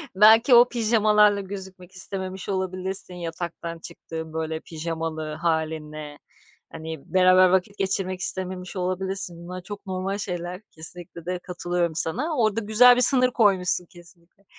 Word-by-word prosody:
belki 220 +5 +6
o 240 +1 +6
pijamalarla 210 -3 +3
gözükmek 190 -2 -10
istememiş 190 0 -5
olabilirsin, 185 0 -3
yataktan 170 -1 -6
çıktığın, 160 -1 -9
böyle, 160 0 -4
pijamalı 160 -1 -5
hâlinle. 155 -2 -4 0.5
Hani, 160 -1 -9
beraber 185 0 +5
vakit 190 +2 0
geçirmek 190 -1 -1
istememiş 185 0 -1
olabilirsin. 185 -1 0
Bunlar 180 +1 -8
çok 205 +2 -9
normal 190 +1 -3
şeyler. 180 -1 -5
Kesinlikle 170 +1 -6
de 180 0 -3
katılıyorum 175 -2 -3
sana. 275 - 0
Orada 220 -1 +1
güzel 230 +4 +6
bir 250 - +1
sınır 255 -1 +7
koymuşsun 185 -5 +3
kesinlikle. 175 +2 -16
185 Hz, 130 wpm, -24 LUFS, 170-200 Hz, 0.5 s, sınır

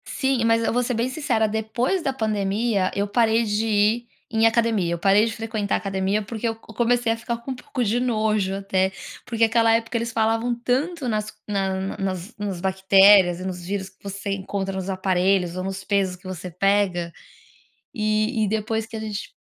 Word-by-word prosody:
Sim, 265 -3 0
mas 230 0 +3
eu - - 0
vou 245 +1 +2
ser 245 - -1
bem 235 +3 0
sincera, 260 -6 0
depois 220 - -1
da 275 - 0
pandemia 210 -3 0
eu 200 +1 0
parei 225 +1 +3
de 210 0 0
ir 215 +3 +2 0.3
em 225 0 +3
academia. 225 -6 +1
Eu - - -2
parei 200 +3 +4
de 225 - -2
frequentar 220 -2 -2
a - - +2
academia 195 +1 -1
porque 225 +2 -4
eu 225 - -1
comecei 235 +1 0
a 225 - -1
ficar 235 +1 -3
com 235 +3 -7
um - - -3
pouco 250 0 -4
de 230 +2 +1
nojo 215 -5 0
até, 190 -1 0 0.3
porque 230 -2 0
aquela 225 0 +4
época 230 +1 0
eles 230 0 -2
falavam 225 +2 +1
tanto 265 +5 -1
nas 215 -2 -2
nas 195 -1 -2
nas 190 +3 -4
nas 200 -4 -4
bactérias 190 -1 +5
e 185 - -6
nos 180 -2 -5
vírus 195 0 -3
que - - -32
você 200 0 -5
encontra 195 0 -3
nos 190 0 -4
aparelhos, 185 -1 +1
ou 185 - -3
nos 195 0 -4
pesos 195 -2 0
que 180 - -22
você 185 -1 -6
pega. 180 -1 +1 0.8
E 215 0 +1
e - - 0
depois 220 +1 -1
que 225 - -8
a - - -5
gente 215 -2 -5
215 Hz, 195 wpm, -23 LUFS, 195-230 Hz, 0.8 s, bactérias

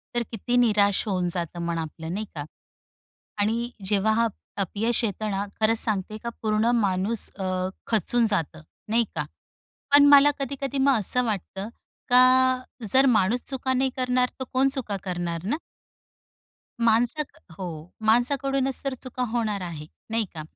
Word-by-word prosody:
तर 240 - +1
किती 230 +2 -2
निराश 205 -4 +3
होऊन 185 -3 0
जातं 175 -1 -3
मन 170 0 -2
आपलं 160 +1 -5
नाही 215 +2 -3
का. 145 - -4 1.0
आणि 230 +3 0 0.2
जेव्हा 210 +2 +2
हा 230 +1 +2 0.3
अपयश 220 +6 -1
येते 215 0 -2
ना 195 +1 -2 0.2
खरंच 220 +1 +3
सांगते 215 0 0
का 235 - -2
पूर्ण 215 +2 +1
माणूस 200 0 +1
अ, - - -3 0.4
खचून 230 +2 +2
जातं 170 -7 -1 0.3
नाही 230 +2 +3
का. - - -2 0.7
पण 285 0 +8
मला 285 0 +7
कधी-कधी 275 0 -3
मग 270 -1 +4
असं 250 +5 +4
वाटतं 200 -1 -4 0.4
का 255 +1 +5 0.3
जर 265 +3 +5
माणूस 215 +5 +2
चुका 260 -1 -1
नाही 265 +1 +1
करणार 250 0 +1
तर - - -2
कोण 265 +1 +3
चुका 225 -8 -2
करणार 175 -2 -3
ना? 265 +9 0 1.3
माणसात 240 +6 +1 0.2
हो 185 - -4 0.4
माणसाकडूनच 265 +3 +2
तर 275 -1 -2
चुका 255 -1 -4
होणार 220 -4 -1
आहे 165 -4 -6 0.2
नाही 225 -1 0
का. 160 - -6
225 Hz, 150 wpm, -25 LUFS, 195-255 Hz, 1.3 s, पण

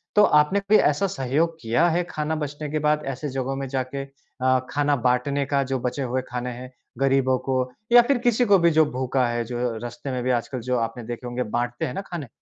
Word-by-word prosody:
तो 210 - +7
आपने 150 +2 +4
कोई 200 +2 +4
ऐसा 150 +7 +2
सहयोग 160 0 -1
किया 120 +9 +2
है 175 +2 +1
खाना 155 +1 -2
बचने 145 +1 -5
के 155 - 0
बाद 150 0 +1
ऐसे 145 +3 -5
जगहों 135 0 -3
में 135 0 -4
जाके? 130 +1 -3
अ, 130 -1 -1
खाना 145 0 +1
बाँटने 140 +3 +1
का 140 0 +1
जो 130 - 0
बचे 125 +3 -3
हुए 130 +1 -1
खाने 125 0 -3
हैं, 125 +1 -9 0.3
गरीबों 135 -1 +2
को 130 - +2 0.3
या 240 0 +9
फिर 265 +3 +1
किसी 240 +1 +3
को 205 -3 +6
भी 170 0 +4
जो 155 0 +5
भूखा 130 0 0
है, 120 0 -1
जो 120 0 -2
रास्ते 120 +4 -6
में 125 -1 -2
भी 130 - -1
आजकल 130 +2 -6
जो 125 - +3
आपने 115 +1 -3
देखे 120 +2 -6
होंगे 120 +1 -2
बाँटते 120 0 -2
हैं 125 - -4
ना - - -3
खाने, 175 -7 -7
135 Hz, 225 wpm, -24 LUFS, 125-150 Hz, 0.3 s, या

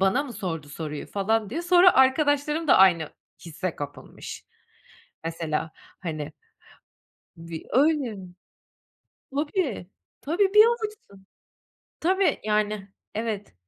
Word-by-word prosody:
bana 195 +8 +3
mı 265 - -8
sordu 165 -8 -5
soruyu 150 0 -6
falan 210 +1 0
diye. 335 - -3
Sonra 355 +1 +6
arkadaşlarım 290 +3 +3
da - - +7
aynı 170 -5 +5 0.3
hisse 170 +2 -4
kapılmış. 145 0 -8 0.8
Mesela, 165 -1 -2 0.3
hani 155 -4 -5 1.0
Di 165 -1 -8
öyle. 275 -5 +2 1.1
Tabii, 290 - -2 0.3
tabii 385 +6 +1
bir 425 +1 +9
avuçsun. 430 - -4 0.8
Tabii, 380 +3 +2
yani 210 -1 0 0.3
evet. 215 - -4
215 Hz, 100 wpm, -25 LUFS, -, 1.1 s, bir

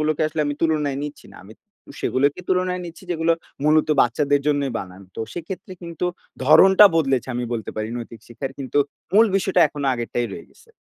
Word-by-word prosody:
গুলোকে 155 0 0
আসলে 155 - -3
আমি 145 - -2
তুলনায় 150 -4 0
নিচ্ছি 145 0 -8
না। - - -14
আমি 105 - -13 0.5
সেগুলোকে 140 +5 +1
তুলনায় 185 0 0
নিচ্ছি 170 +3 -10
যেগুলো 165 0 +2 0.3
মূলত 155 +1 +3
বাচ্চাদের 145 +4 +2
জন্যই 145 -3 +1
বানানো। 95 +1 -11
তো - - -4
সেক্ষেত্রে 180 +2 -7
কিন্তু 170 +1 -4 0.4
ধরণটা 190 +8 +7
বদলেছে 135 -5 +1
আমি 125 - -2
বলতে 115 -2 -4
পারি 110 0 -3
নৈতিক 115 -2 -9
শিক্ষার 130 +3 -6
কিন্তু 135 +1 -2 0.4
মূল 220 +2 +7
বিষয়টা 190 -2 +1
এখনো 145 -1 -4
আগেরটাই 120 0 -2
রয়ে - - -9
গেছে। 460 +1 -23
150 Hz, 175 wpm, -22 LUFS, 130-170 Hz, 0.5 s, ধরণটা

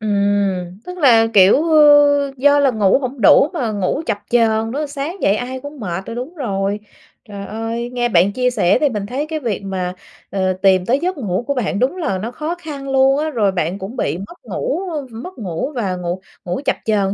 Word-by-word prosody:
Ừm, 200 -3 0
tức 360 0 -8
là, 235 -8 +5
kiểu, 200 +9 +6
ờ, 290 -2 +5
do 285 +2 +4
là 280 -2 +3
ngủ 210 -3 +3
hổng 255 -1 -5
đủ 275 +8 +6
mà 255 -10 -2
ngủ 205 +7 -1
chập 220 -3 -1
chờn 225 -1 +2
nữa, 295 +4 -2
sáng 290 +5 -5
dậy 195 - +3
ai 255 +3 -4
cũng 285 +1 -10
mệt 190 -2 -5
là - - -5
đúng 255 +8 -6
rồi. 200 - -2 0.5
Trời 200 -1 -7
ơi! 225 +3 -4
Nghe 240 -1 0
bạn 185 0 +3
chia 250 +3 +1
sẻ 180 -7 +2
thì 295 - +2
mình 210 -5 -4
thấy 265 +7 -3
cái 315 0 -3
việc 225 -8 -3
mà, 185 -2 -3 0.4
ờ, 190 -1 0
tìm 185 -1 +2
tới 260 +6 +2
giấc 360 0 -2
ngủ 205 -3 -2
của 280 - +1
bạn 210 -4 -1
đúng 265 +9 0
là 195 - -1
nó 225 +6 -5
khó 315 +6 -4
khăn 290 -5 -7
luôn 270 +1 +4
á. 310 +1 -1
Rồi 215 -8 +1
bạn 180 +1 -2
cũng 195 +6 -7
bị 165 -7 -1
mất 200 - -9
ngủ - - -3 0.3
v - - -16
mất 360 +12 -8
ngủ 195 - -4
và 200 -7 -1
ngủ 180 +1 -4 0.2
ngủ 180 +9 -3
chập - - +2
chờn 200 -3 +1
230 Hz, 220 wpm, -18 LUFS, 195-280 Hz, 0.5 s, kiểu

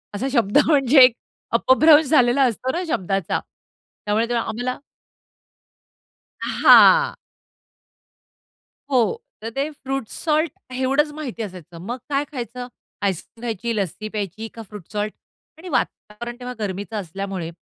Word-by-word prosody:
असा 260 +6 -2
शब्द 230 -2 +2
म्हणजे 275 -3 +5
एक 250 -2 +6 0.4
अपभ्रंश 300 +5 +6
झालेला 255 -2 +4
असतो 255 +1 0
ना 355 - -2
शब्दाचा. 195 - -1 0.7
त्यामुळे 215 +3 +1
ते - - -1
आम्हाला 240 +2 -2 1.6
हां. 485 -1 +6 1.8
हो. 260 - +2 0.2
तर 225 - -4
ते 280 +2 -1
फ्रूट 270 -4 -5
सॉल्ट, 310 -1 0 0.2
एवढंच 270 +4 +1
माहिती 265 -7 -6
असायचं. 180 -4 -9
मग 245 - -3
काय 280 0 +1
खायचं? 245 -1 -6 0.3
आईसक्रीम 200 +4 -3
खायची, 230 +2 -2
लस्सी 205 +1 -3
प्यायची 210 +2 -4
का 230 - -9
फ्रूट 205 -5 -10
सॉल्ट? 210 0 -2 0.4
आणि 360 +3 -10
वातावरण 240 -5 -3
तेव्हा 250 0 -6
गरमीचं 205 +2 -4
असल्यामुळे 190 -1 -5
240 Hz, 120 wpm, -22 LUFS, 205-275 Hz, 1.8 s, एक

